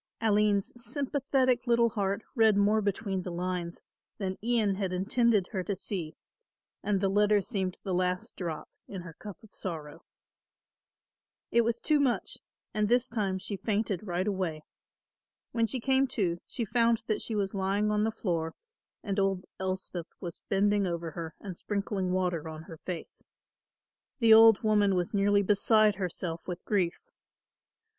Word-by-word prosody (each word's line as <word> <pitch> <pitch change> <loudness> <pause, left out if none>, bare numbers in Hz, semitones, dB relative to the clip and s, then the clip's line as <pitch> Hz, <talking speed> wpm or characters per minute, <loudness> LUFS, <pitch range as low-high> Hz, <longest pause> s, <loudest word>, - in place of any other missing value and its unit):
Aline's 210 -2 +2
sympathetic 270 -3 +1
little 235 0 +4
heart 200 -1 -1
read 220 -5 +4
more 210 +2 +3
between 200 -1 -1
the 180 - -6
lines 175 0 -3 0.3
than 190 -2 -2
Ian 225 -4 +2
had 190 -1 -2
intended 205 +2 +2
her 190 -4 -2
to 200 +1 -2
see 175 -6 -5 0.7
and 205 -2 +1
the 195 - +1
letter 205 +1 +4
seemed 190 -3 -3
the 190 - -2
last 180 0 -1
drop 165 -4 -4 0.2
in 190 -3 -6
her 170 -2 -9
cup 205 +3 -9
of 215 - -17
sorrow. 160 -3 -6 1.5
It 235 - +5
was 235 0 0
too 300 +4 +2
much 265 -4 0 0.3
and 210 -1 +1
this 245 0 +3
time 200 -5 -1
she 200 +2 -4
fainted 205 -3 -1
right 180 +1 -1
away. 180 -6 -2 0.9
When 230 -1 +1
she 255 - -2
came 265 +2 +2
to, 175 -5 +1
she 235 - -3
found 230 +1 +2
that 215 - -1
she 225 - -2
was 200 -1 -1
lying 200 +2 +1
on 210 0 +2
the 220 - +2
floor 170 -7 -2 0.5
and 200 -1 -1
old 195 -1 0
Elspeth 185 -2 -3
was 175 -4 -7
bending 205 0 +2
over 170 -1 -3
her 165 -1 -6
and 190 -4 -7
sprinkling 195 -1 -2
water 180 -4 -1
on 155 0 -8
her 165 -1 -10
face. 175 +1 -7 0.9
The 230 -4 +6
old 225 -1 +8
woman 205 -3 +3
was 180 +2 -1
nearly 200 0 +3
beside 210 +1 +4
herself 175 -3 -4
with 180 -1 -6
grief. 185 -5 +1
200 Hz, 160 wpm, -29 LUFS, 180-220 Hz, 1.5 s, old